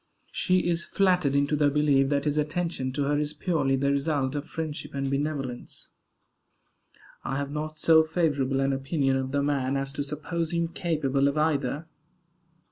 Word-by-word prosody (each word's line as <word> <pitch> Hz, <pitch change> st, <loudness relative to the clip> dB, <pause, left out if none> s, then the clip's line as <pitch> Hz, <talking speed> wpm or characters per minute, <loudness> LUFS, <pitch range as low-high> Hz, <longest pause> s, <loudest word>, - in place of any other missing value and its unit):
She 185 Hz, -1 st, +2 dB
is 170 Hz, -1 st, +1 dB
flattered 180 Hz, -8 st, +2 dB
into 140 Hz, +1 st, +2 dB
the 145 Hz, -1 st, +3 dB
belief 140 Hz, -2 st, +3 dB
that 140 Hz, 0 st, 0 dB
his 150 Hz, -1 st, +1 dB
attention 155 Hz, -3 st, -2 dB
to 145 Hz, +1 st, 0 dB
her 145 Hz, +1 st, +1 dB
is 150 Hz, 0 st, -2 dB
purely 150 Hz, -8 st, 0 dB
the 140 Hz, +1 st, +1 dB
result 140 Hz, -1 st, 0 dB
of 145 Hz, 0 st, -4 dB
friendship 155 Hz, -3 st, -5 dB
and 135 Hz, 0 st, -2 dB
benevolence. 140 Hz, -3 st, -4 dB, 1.3 s
I 135 Hz, -, -2 dB
have 140 Hz, 0 st, -3 dB
not 155 Hz, +1 st, -4 dB
so 160 Hz, +1 st, +6 dB
favorable 145 Hz, -5 st, 0 dB
an 135 Hz, 0 st, +1 dB
opinion 135 Hz, 0 st, 0 dB
of 130 Hz, 0 st, -2 dB
the 140 Hz, 0 st, +1 dB
man 140 Hz, -2 st, 0 dB
as 135 Hz, 0 st, -3 dB
to 145 Hz, -, -2 dB
suppose 155 Hz, +3 st, -3 dB
him 170 Hz, -1 st, 0 dB
capable 145 Hz, -6 st, 0 dB
of 140 Hz, +2 st, -1 dB
either. 150 Hz, -1 st, 0 dB
145 Hz, 170 wpm, -27 LUFS, 135-155 Hz, 1.3 s, so